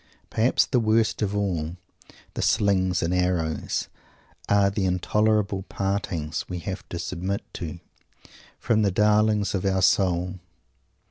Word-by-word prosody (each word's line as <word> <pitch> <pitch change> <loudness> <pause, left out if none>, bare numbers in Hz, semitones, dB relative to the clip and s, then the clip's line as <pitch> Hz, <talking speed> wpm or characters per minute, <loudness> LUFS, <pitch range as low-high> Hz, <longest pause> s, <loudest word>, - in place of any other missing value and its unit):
Perhaps 115 +3 +3
the 125 - +1
worst 110 0 +2
of 105 -1 0
all 90 -5 -2 0.6
"the - - -3
slings 95 -3 +2
and 85 +2 0
arrows" 90 -4 -1 0.6
are 100 -1 +4
the 100 0 -2
intolerable 105 +2 +1
partings 90 -6 -2
we 90 - -3
have 95 +3 -5
to 85 - -4
submit 90 +3 -3
to, 85 -1 -6 0.8
from 115 -2 +1
the 100 - +3
darlings 105 +1 +2
of 95 - -1
our 95 -1 +1
soul. 90 -1 +2
95 Hz, 130 wpm, -25 LUFS, 90-105 Hz, 0.8 s, are